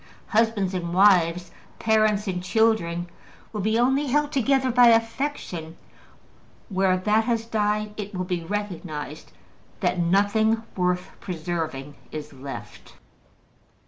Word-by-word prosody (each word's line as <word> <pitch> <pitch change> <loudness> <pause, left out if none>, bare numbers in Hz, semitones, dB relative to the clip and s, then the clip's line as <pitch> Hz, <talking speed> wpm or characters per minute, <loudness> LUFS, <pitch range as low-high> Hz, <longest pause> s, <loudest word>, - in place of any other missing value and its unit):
Husbands 215 -4 +1
and 175 -1 -3
wives, 180 -3 +4 0.3
parents 215 -2 +2
and 180 -2 -2
children, 185 -5 +1 0.5
will 210 - -2
be 220 +3 +1
only 265 +4 +2
held 295 +2 +1
together 265 -1 +2
by 245 0 +6
affection: 225 - 0 0.9
where 190 -1 +2
that 210 +4 +2
has 230 -2 0
died, 210 -1 -1
it 205 -1 -6
will 185 0 -2
be 180 -2 -2
recognized 165 -7 -5 0.5
that 180 - +1
nothing 205 +5 +2
worth 180 0 0
preserving 160 -5 -4 0.2
is 155 -1 -7
left. 135 +1 -9
200 Hz, 115 wpm, -24 LUFS, 175-225 Hz, 0.9 s, by